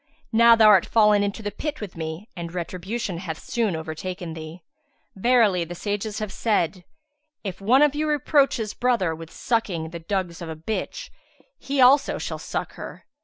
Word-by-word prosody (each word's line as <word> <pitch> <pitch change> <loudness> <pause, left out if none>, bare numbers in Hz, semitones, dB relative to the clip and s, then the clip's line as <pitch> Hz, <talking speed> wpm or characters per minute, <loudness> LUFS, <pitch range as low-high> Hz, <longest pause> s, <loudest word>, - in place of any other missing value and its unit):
Now 235 0 +7
thou 225 -1 +5
art 195 -4 +6
fallen 210 -2 +4
into 205 +2 -2
the 205 - -3
pit 300 +8 -4
with 205 -4 -7
me 160 +5 -5
and 170 -2 -6
retribution 185 +2 -4
hath 165 -4 -5
soon 225 -7 -1
overtaken 165 +2 -5
thee. 160 +2 -9 0.5
Verily, 210 -4 +3
the 175 +1 -7
sages 205 +3 -3
have 215 -3 -4
said, 190 -5 0 0.6
'If 195 -2 -5
one 250 +8 +5
of 295 -2 +4
you 305 +1 -1
reproach 290 -1 +3
his 215 -3 -3
brother 235 -9 +1
with 165 0 -9
sucking 180 -10 -2
the 170 - -6
dugs 180 0 -3
of 170 - -6
a 160 - -5
bitch, 165 +8 -5 0.5
he 280 0 -3
also 265 +2 +5
shall - - -5
suck - - -4
her.' - - -9
200 Hz, 175 wpm, -24 LUFS, 170-230 Hz, 0.6 s, Now